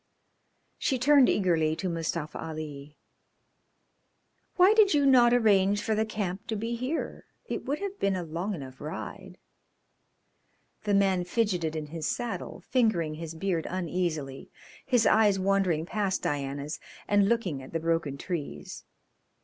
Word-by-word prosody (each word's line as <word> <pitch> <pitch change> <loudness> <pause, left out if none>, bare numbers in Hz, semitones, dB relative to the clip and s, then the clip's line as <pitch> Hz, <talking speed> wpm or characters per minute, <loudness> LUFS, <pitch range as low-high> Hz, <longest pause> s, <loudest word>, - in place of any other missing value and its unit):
She 265 - +1
turned 275 +1 +5
eagerly 165 -5 +2
to 190 - -3
Mustafa 165 -2 -3
Ali. 150 -2 -7 1.6
"Why 375 +3 +6
did 420 -6 +5
you 285 -1 +3
not 250 -3 +6
arrange 205 -4 +3
for 220 - 0
the 215 +1 0
camp 200 -3 -4
to 220 - -2
be 225 +3 -3
here? 255 +7 -3 0.2
It - - -4
would 285 +2 -1
have 400 +1 -5
been 195 -1 +1
a 180 - -3
long 170 +5 -3
enough 135 -4 -9
ride." 180 +4 -7 1.5
The 205 -1 +2
man 190 -2 +3
fidgeted 180 -5 0
in 155 -1 -3
his 160 +1 -4
saddle, 235 -7 -4
fingering 220 -11 +1
his 165 +1 -7
beard 170 -1 -1
uneasily, 170 -6 -3 0.4
his 245 -4 +3
eyes 210 -3 +5
wandering 190 -4 +1
past 195 0 -1
Diana's 140 +1 -3 0.3
and 205 -1 +3
looking 195 -12 0
at 130 - -11
the 165 - -1
broken 165 -4 -1
trees. 140 - -5
185 Hz, 140 wpm, -28 LUFS, 160-220 Hz, 1.6 s, Why